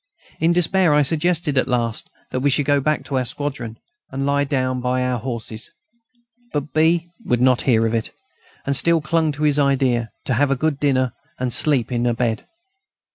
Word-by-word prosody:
In 165 +1 +3
despair, 175 -1 +3
I 150 - +4
suggested 160 -1 +1
at - - 0
last 120 -3 -2 0.2
that 130 - -1
we 140 +2 +2
should 140 +1 +1
go 145 0 +3
back 150 +2 -1
to 135 -2 -1
our - - 0
squadron, 130 -3 -4 0.3
and 135 +1 -3
lie 140 0 +1
down 130 -3 -1
by 125 +1 0
our 125 -1 -1
horses; 115 -2 -5 0.8
but 145 0 -3
B. 165 +2 +2
would 120 - 0
not 125 0 +3
hear 115 -2 +4
of 110 - -1
it, 115 -1 -1 0.6
and 140 - 0
still 170 +4 +3
clung 160 0 +1
to 150 +1 -5
his 150 -1 +3
idea: 130 -4 +1 0.2
to 130 - 0
have 140 +4 +2
a 140 - +2
good 145 +1 -1
dinner, 130 -4 +1 0.3
and 125 -2 -2
sleep 135 -6 +2
in 120 0 0
a 120 - +1
bed. 115 -2 -2
135 Hz, 195 wpm, -21 LUFS, 125-150 Hz, 0.8 s, I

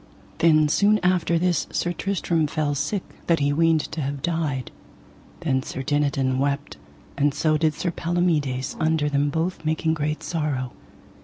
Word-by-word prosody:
Then 155 -2 +5
soon 205 +7 +4
after 180 -2 +2
this 175 -3 +1
Sir 175 - -1
Tristram 170 -4 0
fell 150 -1 -1
sick 160 +8 -1 0.2
that 170 - +4
he 145 0 +2
weened 165 0 +3
to 160 - -3
have 140 0 -4
died; 155 -7 -1 0.7
then 135 -6 +1
Sir 130 0 -5
Dinadan 135 -2 +1
wept, 140 +1 -1 0.4
and 145 0 +1
so 155 -1 +2
did 155 0 +1
Sir 175 - -2
Palomides 160 -7 0
under 155 -2 +1
them 145 0 +1
both 165 +3 -2
making 160 +1 0
great 155 0 -2
sorrow. 145 -7 -2
155 Hz, 155 wpm, -24 LUFS, 145-165 Hz, 0.7 s, Then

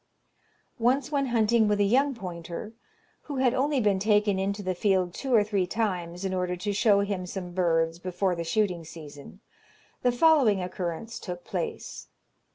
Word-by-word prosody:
Once 255 +4 +1
when 280 -2 +1
hunting 230 -2 +3
with 210 0 +1
a - - +4
young 265 +7 +2
pointer, 180 +1 -7 0.5
who 290 - -5
had 260 -2 +2
only 280 +1 +1
been 205 -4 +2
taken 205 -1 +2
into 200 +1 -2
the 185 0 -1
field 185 -2 +1
two 270 +6 -5
or 225 -4 +5
three 200 -3 0
times, 180 -4 -2
in 190 - -1
order 180 -1 -1
to 200 +3 -3
show 205 -1 +4
him 200 -3 -3
some 180 -1 -6
birds 165 -2 +1
before 185 +1 -1
the 170 - -3
shooting 180 -1 0
season, 155 +2 -11 0.6
the 250 - +3
following 250 -6 +4
occurrence 180 +4 -4
took 175 -2 -7
place. 455 -2 -5
200 Hz, 165 wpm, -27 LUFS, 180-230 Hz, 0.6 s, or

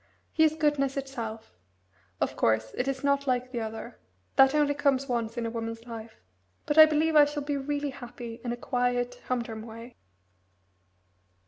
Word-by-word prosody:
He 320 - +4
is 315 0 +4
goodness 290 -3 +1
itself. 230 - -5 0.7
Of - - -1
course, 110 0 +1
it 250 - -1
is 270 0 -2
not 280 0 +1
like 255 0 0
the 240 - -3
other. 225 +1 -6 0.4
That 270 +2 +6
only 295 -1 +3
comes 275 -2 +1
once 235 -2 -2
in 235 - -1
a 230 - -2
woman's 230 0 -5
life, 225 -2 -8 0.5
but 295 +1 +2
I 315 - +11
believe 310 +1 +1
I 295 -1 +8
shall 290 0 -4
really 285 0 -2
be 290 - -1
happy 240 -3 -9
in 240 - -2
a 240 - -3
quiet, 245 -1 -1
humdrum 235 -3 -2
way." 230 +2 -10
250 Hz, 175 wpm, -28 LUFS, 230-285 Hz, 0.7 s, I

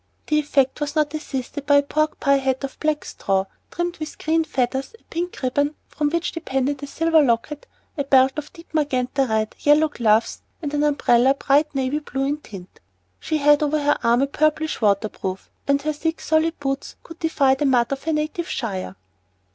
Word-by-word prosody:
The 300 -1 +2
effect 280 -2 +1
was 290 0 -2
not 300 -1 +1
assisted 285 -1 -5
by 285 - +5
a 285 - +5
pork 305 +2 -1
pie 280 -1 +3
hat 265 0 -1
of 275 - -6
black 305 -1 -1
straw 195 -1 -1 0.2
trimmed 345 0 -3
with 310 0 -6
green 325 +1 +1
feathers, 265 - -2
a - - -33
pink 350 +2 -3
ribbon 285 +4 0
from 295 -1 -1
which 340 +2 -1
depended 275 -3 -2
a 285 - -5
silver 325 +2 +3
locket, 275 +3 0 0.3
a - - +2
belt 265 -1 +5
of 300 -1 -6
deep 335 -2 -16
magenta 270 -3 0
red, 220 0 0
yellow 300 +2 +4
gloves, 225 -5 +1 0.2
and 295 -3 -5
an 295 - +1
umbrella 270 -3 +3
bright 290 +2 +2
navy 270 +2 0
blue 270 -2 -3
in 285 +2 0
tint. 195 -10 -12 0.4
She 315 - -1
had 295 0 +4
over 300 0 +1
her 290 0 +1
arm 235 +2 +3
a - - +4
purplish 310 +1 0
water 205 0 +3
proof, 190 -2 -6 0.2
and 280 0 +3
her 305 0 0
thick, 325 +2 -2
solid 320 +1 +1
boots 275 -1 -3
could 330 -1 -12
defy 285 -5 +2
the 275 +2 0
mud 245 -2 +2
of 275 0 -3
her 325 - 0
native 310 +3 -2
shire. 190 - -4
285 Hz, 195 wpm, -22 LUFS, 265-310 Hz, 0.4 s, by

